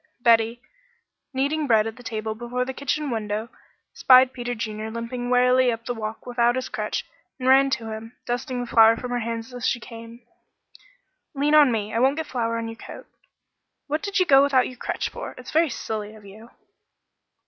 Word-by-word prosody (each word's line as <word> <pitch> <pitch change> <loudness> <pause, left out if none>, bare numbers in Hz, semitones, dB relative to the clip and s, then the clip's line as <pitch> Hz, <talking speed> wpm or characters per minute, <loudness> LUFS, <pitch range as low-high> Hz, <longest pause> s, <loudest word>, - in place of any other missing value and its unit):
Betty, 230 0 +3 0.7
kneading 285 +3 -1
bread 220 -3 +4
at 225 +2 -6
a - - -10
table 220 -2 -4
before 240 +3 -3
the 265 - -5
kitchen 280 +1 -2
window, 215 0 -3 0.4
spied 255 0 +6
Peter 245 -1 -4
Junior 215 -1 -4
limping 235 +2 -5
wearily 250 0 +4
up 230 0 -6
the 245 - -2
walk 220 -1 -6
without 240 -1 +1
his 255 - -3
crutch, - - -3 0.3
and 255 -1 -4
ran 270 +1 +6
to 225 -4 -3
him, 220 +2 -8
dusting 245 +1 -3
the - - -3
flour 225 -1 +5
from 250 0 -6
her 245 - 0
hands 230 +1 -5
as 245 0 -2
she 250 - 0
came. 230 +1 -11 1.1
"Lean 290 +2 +1
on 295 -4 +7
me. 215 -2 -2
I 230 - +1
won't 270 +4 +3
get 320 - -2
flour 230 -4 -2
on 230 0 -3
your 225 0 -8
coat. - - -10 0.8
What 305 +2 -2
did 400 -1 -3
you 365 - +4
go 270 -4 +6
without 275 -3 +3
your 255 - -10
crutch - - -3
for? - - -8
It's - - -10
very 325 0 +3
silly 215 -3 -5
of 215 -1 -15
you." 215 +4 -13
240 Hz, 195 wpm, -24 LUFS, 225-260 Hz, 1.1 s, on